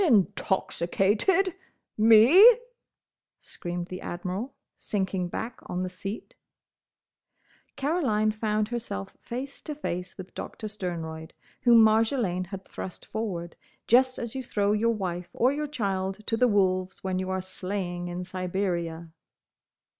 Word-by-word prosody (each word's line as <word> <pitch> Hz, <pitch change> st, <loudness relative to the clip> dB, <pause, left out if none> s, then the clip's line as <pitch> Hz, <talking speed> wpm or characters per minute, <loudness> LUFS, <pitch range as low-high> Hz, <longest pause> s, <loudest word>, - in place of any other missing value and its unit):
"Intoxicated!—Me!" 225 Hz, -, +4 dB, 0.8 s
screamed 175 Hz, 0 st, -5 dB
the 185 Hz, -, -6 dB
Admiral, 185 Hz, +9 st, -4 dB, 0.2 s
sinking 190 Hz, -3 st, -2 dB
back 225 Hz, +6 st, -5 dB
on 180 Hz, +1 st, -2 dB
the 185 Hz, -, -2 dB
seat. 195 Hz, +4 st, -6 dB, 1.4 s
Caroline 265 Hz, -8 st, +1 dB
found 215 Hz, 0 st, -1 dB
herself 225 Hz, -, -5 dB
face 260 Hz, +4 st, -6 dB
to 300 Hz, -, -5 dB
face 180 Hz, -, -4 dB
with 190 Hz, 0 st, -9 dB
Doctor 215 Hz, -, -6 dB
Sternroyd, 165 Hz, -6 st, -5 dB, 0.3 s
whom 235 Hz, -3 st, +7 dB
Marjolaine 220 Hz, -4 st, +2 dB
had 195 Hz, 0 st, -7 dB
thrust 180 Hz, -, -8 dB
forward, 180 Hz, -6 st, -4 dB, 0.3 s
just 255 Hz, +2 st, +4 dB
as 235 Hz, -2 st, -5 dB
you 265 Hz, -, -3 dB
throw 205 Hz, -5 st, 0 dB
your 225 Hz, +2 st, +2 dB
wife 180 Hz, -3 st, -4 dB
or 255 Hz, +3 st, +3 dB
your 300 Hz, +1 st, -2 dB
child 195 Hz, -6 st, -2 dB
to 225 Hz, -, +1 dB
the 250 Hz, +2 st, +4 dB
wolves 185 Hz, -3 st, +1 dB
when 185 Hz, -1 st, -1 dB
you 185 Hz, 0 st, -3 dB
are 190 Hz, 0 st, 0 dB
sleighing 185 Hz, -1 st, -4 dB
in 175 Hz, +1 st, -4 dB
Siberia. 175 Hz, -3 st, -3 dB
200 Hz, 125 wpm, -27 LUFS, 180-230 Hz, 1.4 s, whom